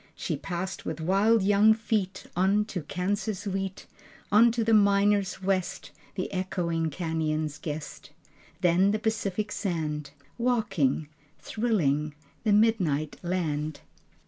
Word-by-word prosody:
She - - -3
passed 185 +1 -5
with 160 0 -4
wild 195 +6 +3
young 205 +2 +5
feet 210 -4 -2
On 195 +4 +3
to 195 -5 -4
Kansas 195 +5 -2
wheat, 195 -1 -3 0.5
On 230 +3 +6
to 235 0 0
the 225 0 +2
miners' 200 -1 +3
west, 190 0 -1 0.2
The 185 - -3
echoing 170 -3 -1
cañons' 155 -2 -2
guest, 150 -1 -6 0.5
Then 180 +2 +4
the 210 - +1
Pacific 210 -2 -2
sand, 150 -6 -2 0.3
Waking, 195 - +1 0.3
Thrilling, 155 - 0 0.3
The 215 - +2
midnight 190 -9 +2
land.... 155 -4 -2
190 Hz, 120 wpm, -27 LUFS, 160-210 Hz, 0.5 s, On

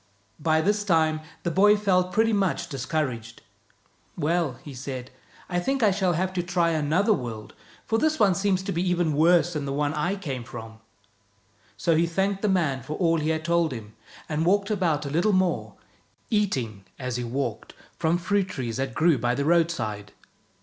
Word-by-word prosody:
By 160 +1 +2
this 205 +4 +1
time 160 -5 +2 0.2
the 170 - -1
boy 205 +4 +5
felt 185 -3 +1
pretty 225 +3 +2
much 195 -4 0
discouraged. 130 -4 -3 0.4
" - - -37 0.3
Well," 165 -2 0
he 145 - -9
said, 130 -1 -6 0.2
" - - -25
I 175 -1 -1
think 270 +7 -1
I 210 - +5
shall 185 -2 +1
have 185 +3 -1
to 180 - 0
try 175 -1 +1
another 160 +7 +2
world, 115 - -5 0.3
for 225 0 +1
this 310 +2 +1
one 205 -4 +5
seems 195 0 0
to 195 - -3
be 170 -2 -1
even 175 -3 +1
worse 170 +3 +4
than 150 -2 -3
the 140 - -3
one 145 +1 0
I 175 +6 0
came 140 -11 -5
from." 110 -1 -9 1.0
So 165 -2 +2
he 165 +2 +3
thanked 195 +3 -1
the 210 - +1
man 155 -9 +1
for 135 +5 -6
all 165 -3 +2
he 155 +1 -1
had 160 -1 -1
told 170 -2 +2
him, 110 -4 -8 0.3
and 155 0 -1
walked 200 +4 +2
about 165 -8 0
a 140 - -4
little 175 +7 +2
more, 185 -1 0 0.6
eating, 130 - -1
as 125 -3 -3
he 125 - -3
walked, 120 -2 -4 0.2
from 165 0 +2
fruit 195 +2 0
trees 125 -9 -4
that 135 -3 -3
grew 160 -4 +3
by 120 +1 0
the 140 +2 -1
roadside. 155 - 0
165 Hz, 190 wpm, -25 LUFS, 135-185 Hz, 1.0 s, boy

